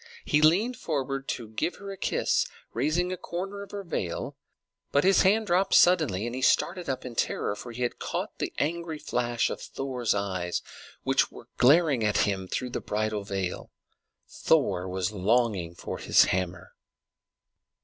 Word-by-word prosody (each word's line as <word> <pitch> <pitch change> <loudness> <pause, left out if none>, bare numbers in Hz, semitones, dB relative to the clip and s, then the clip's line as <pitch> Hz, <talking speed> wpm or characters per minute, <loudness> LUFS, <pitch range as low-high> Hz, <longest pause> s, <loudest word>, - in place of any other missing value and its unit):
He 150 - +3
leaned 200 +11 +4
forward 135 -5 -3
to 115 -3 -4
give 110 +10 -2
her 200 0 -8
a - - -6
kiss, - - +1 0.3
raising 160 +9 0
a - - -5
corner 190 +3 -5
of 200 - -9
her 200 -1 -6
veil; 95 - -3 0.6
but 145 - +3
his 195 +1 +5
hand 215 +4 +3
dropped 190 +1 +2
suddenly, 155 - +4
and 120 - -4
he 130 - -4
started 175 +6 +2
up 130 -1 -3
in 125 - -6
terror, 105 - -1
for 120 +3 -8
he 125 +2 -4
had 120 - -2
caught - - -4
the - - -2
angry 165 +1 -2
flash 120 -5 -1
of - - -5
Thor's 125 -5 -2
eye, 95 -3 -2 0.5
which - - +2
was - - -12
glaring 140 -2 +5
at 105 0 +2
him 95 -2 -2
through 125 +6 -3
the - - -3
bridal 105 -1 -2
veil. 95 -2 -4 0.6
Thor 95 - +1
was 95 +1 -1
longing 100 -4 +1
for - - -6
his - - +5
hammer. 90 0 -2
125 Hz, 170 wpm, -27 LUFS, 100-170 Hz, 0.6 s, his